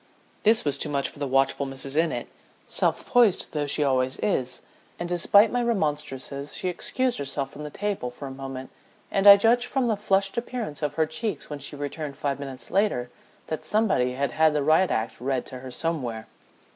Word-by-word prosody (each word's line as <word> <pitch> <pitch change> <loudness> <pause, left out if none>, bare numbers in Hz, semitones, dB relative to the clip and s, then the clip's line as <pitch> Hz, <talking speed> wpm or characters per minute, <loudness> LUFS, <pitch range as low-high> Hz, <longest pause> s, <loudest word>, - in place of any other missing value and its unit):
This 220 -2 +4
was 145 - +3
too - - -1
much 140 -1 -1
for - - -15
the 145 - -2
watchful 135 +1 +1
Mrs. 135 +1 -5
Innitt, 160 +1 0 0.4
self - - 0
poised 240 -7 +3
though 150 -2 -1
she 150 +1 +1
always 130 -1 +1
is, 130 -11 -1 0.4
and 175 - -4
despite 200 +5 +4
my 245 - 0
remonstrances 150 - -2
she 185 - -1
excused 255 - 0
herself 140 -1 -3
from 150 - -9
the 150 - -5
table 195 -6 -3
for 135 +3 -9
a - - -7
moment, 135 -1 -7 0.4
and 195 +1 +2
I 200 0 +12
judge 235 +4 +3
from 255 -3 0
the 220 - +2
flushed 195 0 +1
appearance 235 - -5
of 150 -1 -2
her 160 - +2
cheeks 160 +4 -3
when 145 - -5
she 140 +1 -4
returned 145 0 -5
five 140 -1 -2
minutes 135 -3 -8
later 180 -12 +1 0.3
that 155 - -4
somebody 195 - +1
had 140 0 -1
had 155 +2 +3
the 145 - +1
riot 160 +5 +4
act 110 +1 -2
read 130 -1 -1
to 130 - -8
her 130 0 -9
somewhere. 125 -7 -1
150 Hz, 195 wpm, -25 LUFS, 135-195 Hz, 0.4 s, I